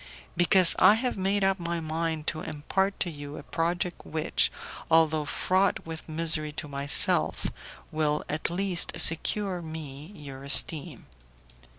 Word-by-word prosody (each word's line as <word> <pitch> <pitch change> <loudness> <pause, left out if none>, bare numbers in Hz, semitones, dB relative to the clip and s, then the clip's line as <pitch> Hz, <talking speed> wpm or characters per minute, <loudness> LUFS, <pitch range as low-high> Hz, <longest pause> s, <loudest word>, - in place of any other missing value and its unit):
"Because 175 +1 +6
I 195 +3 +7
have 250 +2 -2
made 195 +1 0
up 195 0 +1
my 170 0 -3
mind 160 -1 -3
to 155 -2 -2
impart 190 +6 -2
to 175 - 0
you 145 -1 -9
a - - -9
project 175 +2 -3
which, 160 +1 0 0.4
although 160 -2 +2
fraught 185 +6 0
with 160 0 -9
misery 155 -1 0
to 150 - -5
myself, 140 0 0 0.5
will 150 -1 -1
at 150 +1 -1
least 180 0 0
secure 180 +3 +1
me 155 -3 -9
your 135 -4 -10
esteem." 145 0 +3
165 Hz, 140 wpm, -27 LUFS, 150-180 Hz, 0.5 s, I